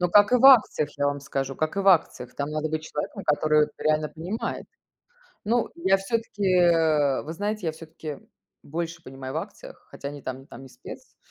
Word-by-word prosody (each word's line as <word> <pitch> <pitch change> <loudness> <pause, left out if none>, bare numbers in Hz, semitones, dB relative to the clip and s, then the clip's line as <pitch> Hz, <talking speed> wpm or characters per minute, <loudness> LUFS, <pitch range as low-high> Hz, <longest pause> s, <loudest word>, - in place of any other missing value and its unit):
Ну, 180 - +2
как 205 +4 +6
и - - +7
в 250 - 0
акциях, 215 - +6
я 145 - +2
вам 145 0 -1
скажу, 135 -1 -4
как 155 +3 -2
и 200 - +1
в 195 - +2
акциях. 160 -8 +2
Там 140 +1 -3
надо 155 +1 -2
быть 155 0 -3
человеком, 150 -1 -5
который 150 0 +3
реально 155 0 +1
понимает. 180 +8 -5 0.8
Ну 235 +2 +1
я 190 +3 +3
всё-таки, 210 +1 -3
э 160 -6 +3
вы 160 - -6
знаете, 205 0 -3
я - - +1
всё-таки 155 -2 -9 0.4
больше 165 +2 -5
понимаю 135 -1 -8
в - - -2
акциях, 470 - -9
хотя 140 - -7
ни 145 0 -8
там, 130 0 -6
ни 135 - -17
там 135 - -12
не 135 - -11
спец. - - -12
155 Hz, 200 wpm, -25 LUFS, 145-195 Hz, 0.8 s, и